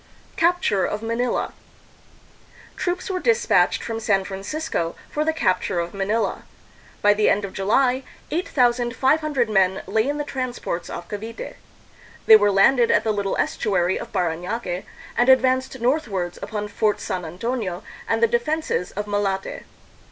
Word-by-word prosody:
Capture 335 - +2
of 210 +1 -2
Manila. 230 +2 -1 1.2
Troops 360 0 -2
were 375 -1 -2
dispatched 470 +4 +2
from 225 -1 -3
San 200 -3 +1
Francisco 195 - -3 0.2
for 300 - 0
the 320 - +2
capture 185 - 0
of 170 0 -3
Manila. 205 +3 -1 0.6
By 205 0 +6
the 210 0 +2
end 205 0 +2
of 190 - -8
July, 250 +7 +2 0.3
8,500 260 -1 +1
men 190 -3 +2
lay 220 +5 +1
in 290 +1 -1
the 295 - -1
transports 255 -10 -4
off 175 - -6
Cavite. 220 +2 -6 0.7
They 220 - +10
were 205 -1 +5
landed 235 +5 +4
at - - +3
the 220 - +1
little 200 -1 -1
estuary 185 -3 0
of - - -8
Paranaque, 180 +3 -2 0.3
and 245 +2 +3
ad 260 0 +8
vanced 260 0 0
northwards 220 - -1
upon 210 -1 -4
Fort 210 0 0
San 185 -1 -3
Antonio 185 +2 -3 0.3
and 225 0 +1
the - - +7
de 240 +2 +2
fenses 305 - -2
of 205 +1 -3
Malate. 205 -2 -2
220 Hz, 150 wpm, -23 LUFS, 195-260 Hz, 1.2 s, They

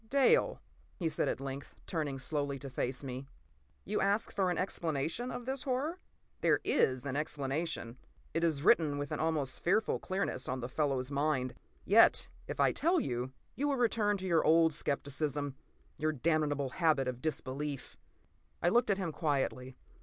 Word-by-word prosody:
p> 225 - -26
"Dale," 280 - +3 0.4
he 170 - -1
said 155 - 0
at - - -1
length, 135 +1 -6
turning 150 -5 -2
slowly 140 +1 -2
to 135 0 -8
face 125 +1 -2
me, 130 0 -6 0.6
"you - - -1
ask 200 +3 +2
for 190 -2 +1
an 175 - -1
explanation 170 - -1
of 245 - -5
this 265 +1 -1
horror? 285 +7 -1 0.4
There - - +3
is 130 -1 +2
an 140 -1 -2
explanation. 145 -3 -2 0.4
It 165 +2 0
is 155 -4 +1
written 150 -4 +4
with 145 0 -4
an - - -2
almost 155 -4 0
fearful 210 +5 +2
clearness 185 -9 -2
on 130 +1 -2
this 125 +1 -5
fellow's 135 -3 0
mind. 140 -3 0 0.3
Yet 225 +3 +6 0.2
if - - -5
I - - +5
tell 345 +3 +2
you, 125 - -2 0.2
you 285 +5 0
will 285 - +2
return 220 -4 +2
to 190 - -6
your 170 -3 +3
old 160 0 +5
skepticism—your 145 +1 -3
damnable 145 -1 +1
habit 155 -3 +2
of 125 -1 -4
disbelief!" 140 -2 -3 0.6
I 175 - +3
looked 235 +3 +3
at 200 - +3
him 185 -4 -2
quietly. 135 -4 -1
150 Hz, 170 wpm, -33 LUFS, 135-185 Hz, 0.6 s, Yet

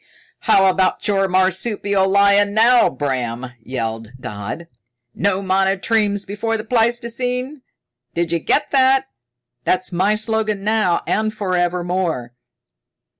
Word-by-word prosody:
"How 195 - +3
about 185 0 +1
your 195 -2 +2
marsupial 190 +1 +1
lion 200 +1 +3
now, 235 +3 +5
Bram?" 130 -3 -3
yelled 115 -2 -5
Dodd. 110 +10 -6 0.5
"No 200 0 0
monotremes 195 +2 +1
before 225 +3 -2
the 215 - -6
pleistocene! 245 +4 -1 0.5
D'you 170 0 0
get 290 - 0
that? 265 0 +3 0.5
That's 185 +1 0
my 190 +4 +1
slogan 215 -2 -1
now 210 -5 +1
and 215 0 0
for 200 -4 -3
ever 175 0 0
more!" 170 -9 -2
195 Hz, 115 wpm, -19 LUFS, 175-220 Hz, 0.5 s, now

